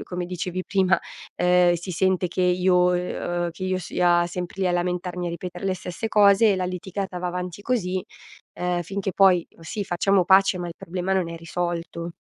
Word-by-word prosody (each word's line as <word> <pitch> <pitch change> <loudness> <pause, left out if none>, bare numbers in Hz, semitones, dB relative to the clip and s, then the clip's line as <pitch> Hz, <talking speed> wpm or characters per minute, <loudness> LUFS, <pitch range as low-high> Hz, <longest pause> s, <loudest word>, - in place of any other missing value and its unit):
come 180 0 -2
dicevi 180 +1 -4
prima, 190 -2 +2 0.4
ehm, 180 0 +4
si 175 +2 -4
sente 185 0 +1
che 185 - -2
io, 180 0 +3
ehm, 175 -1 -2
che 180 +3 -6
io 185 0 0
sia 175 -1 +2
sempre 180 +2 -5
lì 185 - +2
a - - +2
lamentarmi 180 0 -2
a - - -2
ripetere 175 +2 -6
le 190 -1 0
stesse 180 +4 -5
cose 205 0 +5
e - - 0
la 185 - -2
litigata 185 +1 -4
va 180 - -2
avanti 180 +1 -5
così, 190 -6 -1 0.5
ehm, 180 0 -1
finché 195 +3 -3
poi 185 -3 +5
sì 165 +6 -4
facciamo 195 +1 +2
pace 190 0 +4
ma 175 - -4
il 170 - -6
problema 180 +2 -4
non 190 -3 +1
è 170 - -6
risolto. 170 0 -4
180 Hz, 190 wpm, -24 LUFS, 175-190 Hz, 0.5 s, cose